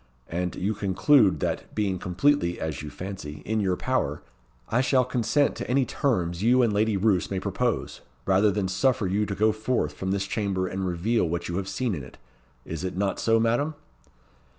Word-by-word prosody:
And 90 +1 -2
you 100 +4 -1
conclude 105 +3 +3
that, - - -3
being 100 -4 0
completely 90 +1 +1
(as 80 -1 -3
you 75 - -6
fancy) 90 -5 -7
in 110 +1 0
your 95 -3 +1
power, 90 - -1 0.4
I 125 - +2
shall 130 -1 +3
consent 125 +4 +1
to - - -5
any 130 +1 +3
terms 90 - -1
you 125 +3 +4
and 115 -3 +2
Lady 105 0 +2
Roos 95 -2 +2
may 95 - -2
propose, 105 +5 -2 0.2
rather 95 +2 +4
than 100 -1 0
suffer 105 +4 +1
you 100 +3 0
to 100 - -3
go 110 +3 +3
forth 110 -8 -1
from 95 +5 -4
this 100 0 0
chamber 100 -3 -1
and 95 +1 -3
reveal 90 +2 0
what 85 +1 -3
you 85 - -2
have 95 -1 -3
seen 125 -4 -1
in 75 - -4
it. - - -13 0.5
Is 80 +1 -5
it 95 0 -4
not 100 0 0
so, 115 0 +3
Madam?" 120 +7 +1
100 Hz, 195 wpm, -26 LUFS, 90-115 Hz, 0.5 s, you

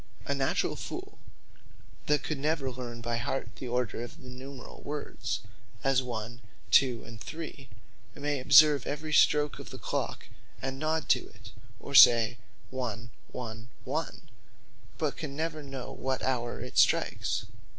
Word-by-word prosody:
A - - 0
naturall - - 0
foole - - -7 0.9
that 150 0 +3
could 155 -3 -3
never 145 -2 0
learn 120 -2 -7
by 120 0 -1
heart 120 -2 -3
the 125 - -6
order 120 -2 -1
of 120 +6 -7
numerall 130 -1 -10
words, 145 0 -4 0.4
as 135 -1 +3
One, 120 -1 -5 0.3
Two, 125 -4 +5
and 115 -1 -11
Three, 155 -4 -7 0.5
may 145 -1 -1
observe 140 +1 +7
every 150 +1 -3
stroak 150 0 +4
of - - -8
the - - -8
Clock, - - -3 0.3
and 135 0 -4
nod 155 +1 0
to - - +3
it, 105 -1 -14 0.3
or 140 - -8
say 120 -3 +8 0.3
one, 115 -3 -4 0.2
one, 115 -2 -7
one; 155 +5 -3 0.7
but 155 -3 -1
can 145 -3 -5
never 155 0 -2
know 135 -3 -6
what 130 0 -2
houre 120 -2 -1
it - - -1
strikes. - - +2
130 Hz, 145 wpm, -30 LUFS, 120-145 Hz, 0.9 s, say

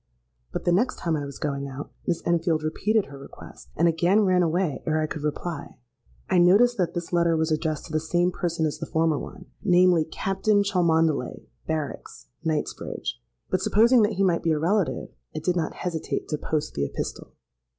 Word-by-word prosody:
But - - -4
the 175 - +3
next 215 +9 +2
time 165 -2 -1
I 145 -2 -3
was 140 - -9
going 140 -1 -3
out, 135 +1 -7 0.2
Miss 175 - -1
Enfield 165 -2 +1
repeated 210 +7 +1
her 140 0 -11
request, 100 - -13
and 170 - +3
again 175 +5 +3
ran 185 -3 +3
away 170 -2 0
ere 155 0 +2
I 155 - +1
could 155 -1 -5
reply. 150 +1 -4 0.5
I 185 - +3
noticed 205 +8 +5
that 175 -1 0
this 175 0 -4
letter 170 -1 +3
was 160 0 0
addressed 155 0 -1
to - - -11
the 155 - +1
same 175 +3 +1
person 170 -2 -1
as 150 - -2
the - - -5
former 160 -2 +1
one—namely, 180 -4 +1
'Captain 195 +5 +1
Cholmondeley, 165 -8 +1 0.2
Barracks, 155 -3 -5
Knightsbridge;'—but 60 - -4
supposing 235 +3 +5
that 210 - +2
he 195 - 0
might 175 -3 +2
be 165 - +2
a - - 0
relative, 185 +3 0 0.3
I - - -3
did 175 +3 0
not 165 -3 -1
hesitate 170 -3 -3
to 150 - -1
post 155 0 -2
the 70 - -1
epistle. 70 - -5
165 Hz, 185 wpm, -25 LUFS, 155-180 Hz, 0.5 s, noticed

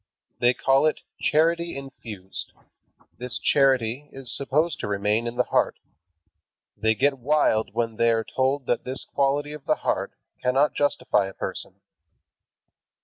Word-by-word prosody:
They 120 +1 +3
call 135 +3 +3
it 155 - -1 0.2
"charity 170 +1 +2
infused." 110 -8 -5 0.7
This 125 0 -1
charity 135 -1 +2
is 135 -2 0
supposed 150 +4 0
to - - -3
remain 105 +3 0
in 120 - -4
the 125 - +3
heart. - - +1 1.0
They 110 0 +1
get 135 +5 +1
wild 125 -4 +1
when 115 -2 -1
they 115 - +3
are 115 -1 +2
told 130 +2 -1
that 120 - 0
this 130 +1 -5
quality 145 +1 0
of 150 -2 -10
the - - +2
heart - - -1 0.3
cannot 130 +4 +2
justify 145 -8 +1
a 95 - -10
person. - - -5
130 Hz, 145 wpm, -25 LUFS, 115-145 Hz, 1.0 s, They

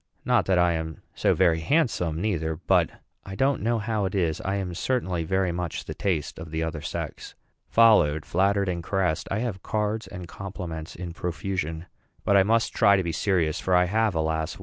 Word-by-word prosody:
Not - - +2
that 95 -2 +3
I 90 0 +4
am 80 -1 -5
so - - +2
very 85 -3 +3
handsome 90 - +1
neither; 80 -5 -1
but, 90 0 +2 0.3
I 95 - -8
don't 135 +4 +1
know 115 +2 +1
how 110 -2 -1
it 95 - -3
is, 85 -5 0
I 95 +1 -1
am 95 -3 -3
certainly 90 -5 -1
very 95 +2 0
much 85 -1 -4
the - - -5
taste 85 -8 -2
of 80 0 -8
the 80 +1 -2
other 80 -2 -4
sex. - - -6 0.3
Followed, 105 -10 +5
flattered, 100 +2 +1
and 85 -2 -2
caressed, 90 -3 0
I 100 +3 -1
have 110 -7 -3
cards 110 +1 -2
and 90 -3 -8
compliments 85 -4 -7
in 85 -1 -6
profusion. 85 -1 -3 0.4
But 100 - +3
I 100 - +7
must 115 +4 +2
try 100 -3 +5
to 95 - +1
be 85 - -2
serious; 85 -3 0
for 95 - +1
I 90 0 +5
have, 110 +1 +1
alas! 80 0 -1
90 Hz, 195 wpm, -26 LUFS, 80-100 Hz, 0.4 s, I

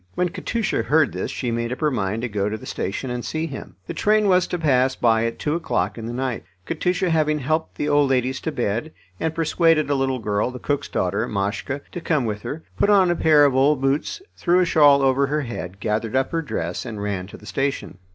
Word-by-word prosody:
When 180 0 +1
Katusha 200 +4 -1
heard 155 +1 +2
this - - -3
she 125 -3 -3
made 115 +1 -2
up 125 - -4
her 150 -1 +1
mind 110 -1 -2
to - - 0
go 105 -2 -1
to 110 - -3
the - - -12
station 125 +6 -3
and 125 -1 -3
see 160 +1 -2
him. 140 -5 -8
The - - -5
train 215 0 +2
was 180 -2 +4
to 180 - -2
pass 130 -5 +2
by 115 -1 +2
at 115 - -3
two 150 - -1
o'clock 165 0 -1
in 115 -1 -6
the - - -4
night. 130 -1 -2 0.2
Katusha 180 +2 0
having 155 -1 +2
helped 155 +3 -1
the 150 - -2
old 145 -1 +3
ladies 130 0 +1
to 160 - -2
bed, 120 +4 -2 0.3
and 160 0 -1
persuaded 165 -2 +2
a - - +4
little 135 -1 0
girl, 105 0 -1
the 125 - -7
cook's 140 +3 -2
daughter, 95 +3 -1
Mashka, 100 +8 -2
to 175 - -6
come 155 -6 +1
with 105 -2 -3
her, 160 +8 -6 0.2
put 205 - +3
on 190 -4 +5
a - - +1
pair 155 -3 +5
of 140 - +3
old 135 +2 +3
boots, 135 - -1
threw 175 0 +2
a 180 - +4
shawl 145 -4 +5
over 135 +1 +3
her 150 +2 0
head, 100 -7 -6
gathered 110 +3 -1
up 130 0 +1
her 165 - 0
dress, 85 - -3
and 115 -4 -6
ran 100 -3 -3
to - - -11
the - - -16
station. 135 -3 -3
135 Hz, 240 wpm, -22 LUFS, 115-160 Hz, 0.3 s, on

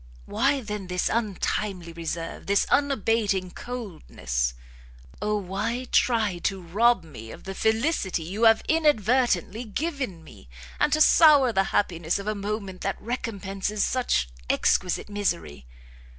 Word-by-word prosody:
why, 270 +6 +1
then, 210 -4 -5
this 180 0 -1
untimely 200 -5 -2
reserve? 165 0 -5
this 200 0 +3
unabating 225 -9 +1
coldness? 155 - -4 0.7
Oh 210 0 0
why 210 +6 -3
try 220 -7 +2
to 195 +2 -1
rob 200 +4 +2
me 115 -9 -11
of - - -11
the 195 - -6
felicity 220 - 0
you 200 +8 -1
have 225 0 +5
inadvertently 245 - +2
given 250 - -4
me! 65 - -15 0.3
and - - +2
to 310 - +2
sour 290 -7 +6
the 195 -1 +2
happiness 170 -5 0
of 200 - -6
a 215 - 0
moment 200 -2 -5
that 195 - -2
recompenses 210 -3 -3
such 245 - 0 0.2
exquisite 180 -1 +1
misery!" 80 - -3
205 Hz, 130 wpm, -25 LUFS, 180-235 Hz, 0.7 s, sour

